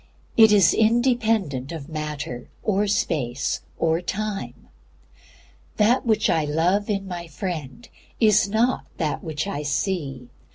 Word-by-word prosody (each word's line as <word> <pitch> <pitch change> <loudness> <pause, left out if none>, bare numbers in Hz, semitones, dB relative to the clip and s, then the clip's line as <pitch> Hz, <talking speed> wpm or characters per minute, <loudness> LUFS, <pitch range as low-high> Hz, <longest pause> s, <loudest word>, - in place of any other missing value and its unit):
It 220 -2 +7
is 200 -4 +6
independent 220 - +1
of 160 -4 -7
Matter, 150 -6 -5
or 205 -1 +1
Space, 140 -10 -1 0.2
or 165 +1 +1
Time. 205 +3 -4 1.1
That 235 +4 +3
which 220 -1 +3
I 160 -2 +2
love 170 +8 +1
in 195 -2 -1
my 175 -2 -6
friend 165 - -6 0.3
is 210 -3 +4
not 230 +5 +1
that 155 -4 -2
which 155 0 -3
I 195 -7 -3
see. 145 -4 -2
180 Hz, 125 wpm, -23 LUFS, 150-215 Hz, 1.1 s, It